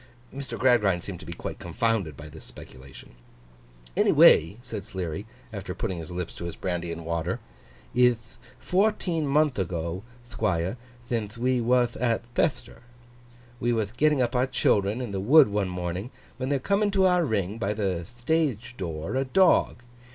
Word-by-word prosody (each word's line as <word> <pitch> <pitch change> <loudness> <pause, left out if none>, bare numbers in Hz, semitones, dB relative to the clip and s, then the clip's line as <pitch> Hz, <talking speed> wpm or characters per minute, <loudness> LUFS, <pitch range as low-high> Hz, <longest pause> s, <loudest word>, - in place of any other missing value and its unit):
Mr. 135 -4 -6
Gradgrind 105 -9 +3
seemed 95 -4 -7
to - - -12
be - - -6
quite - - -6
confounded 105 - -1
by 75 - -9
this 75 +1 -12
speculation. 65 +1 -12 0.8
'Any - - +4
way,' 80 +7 +6
said 115 -6 -6
Sleary, 95 -1 -5 0.3
after 95 -3 -5
putting 95 -7 -3
his 80 - -8
lips 90 -1 -4
to 85 - -7
his 85 - -5
brandy 90 -2 -3
and 85 0 -6
water, 85 +2 -2 0.5
'ith 120 -3 +2 0.2
fourteen 180 -5 +1
month 145 -3 +2
ago, 85 -1 -2 0.3
Thquire, 95 -3 -1 0.3
thinthe 115 -2 -3
we 125 +1 +1
wath 120 0 +2
at 120 -2 0
Chethter. 140 - -1 0.8
We 120 - +1
wath 110 -1 -2
getting 150 -2 +3
up 120 +2 -2
our 125 +1 +2
Children 105 -2 +1
in 120 -5 -4
the 95 - -2
Wood 135 +6 +6
one 100 -2 0
morning, 90 +4 -4 0.3
when 130 0 -3
there 140 - +2
cometh 200 +9 +1
into 195 -2 +3
our 180 -1 +4
Ring, 105 - -1
by 105 -1 -1
the 95 -5 -1
thtage 120 - -1
door, 85 +4 -4
a 135 - +2
dog. 170 -5 +3
110 Hz, 165 wpm, -26 LUFS, 90-130 Hz, 0.8 s, way